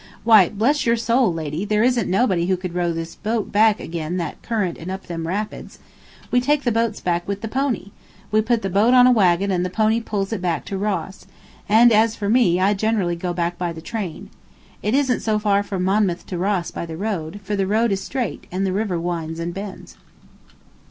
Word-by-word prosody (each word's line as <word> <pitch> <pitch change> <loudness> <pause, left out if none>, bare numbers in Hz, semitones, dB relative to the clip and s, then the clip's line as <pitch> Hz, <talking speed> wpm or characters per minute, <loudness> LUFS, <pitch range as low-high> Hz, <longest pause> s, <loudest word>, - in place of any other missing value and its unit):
"Why, 215 -5 +6
bless 250 +9 +1
your 230 - +4
soul, 230 -1 +2
lady, 160 +1 -4
there 210 +1 +1
isn't 245 -5 +1
nobody 185 -4 +2
who 185 -1 +1
could 180 -1 -6
row 175 -1 0
this 165 0 -5
boat 220 0 -3
back 215 0 +4
agen 165 +1 -4
that 170 -4 -4
current 210 -7 -2
and 165 - -7
up 190 +1 -6
them 165 -1 -5
rapids. 205 +5 -4 0.5
We 245 - +3
take 290 +3 +1
the 240 - +1
boats 230 -1 0
back 175 -1 -1
with 200 0 -3
the 225 - -4
pony. 245 -4 -2 0.4
We 215 0 +4
put 225 0 0
the 195 - -1
boat 215 +7 +4
on 250 0 +7
a 255 - +6
wagon 195 -3 +3
and 180 -1 0
the 180 - -2
pony 220 +4 +1
pulls 205 -2 -3
it 205 - -3
back 175 -2 -1
to 195 - -4
Ross; 195 -2 -3 0.4
and 230 +3 +6
as 220 +1 +3
for 205 -2 -3
me, 210 -7 +3
I 195 +2 +3
generally 200 -4 0
go 175 +1 -3
back 175 0 -2
by 175 -1 -1
the 165 - -8
train. 185 -1 -6 0.5
It 210 +4 0
isn't 265 -3 +2
so 215 -1 0
far 205 -1 +2
from 195 -2 -3
Monmouth 190 -2 +1
to 180 - -5
Ross 190 -2 -1
by 170 - -5
the 160 -1 -7
road, 190 -3 -3
for 205 +2 -2
the 195 -1 0
road 220 +3 +2
is 195 0 -1
straight 250 -6 -4
and 190 +2 -1
the 185 - -1
river 195 -4 -1
winds 165 -1 -3
and 170 +1 -3
bends." 195 0 -8
200 Hz, 220 wpm, -21 LUFS, 175-220 Hz, 0.5 s, on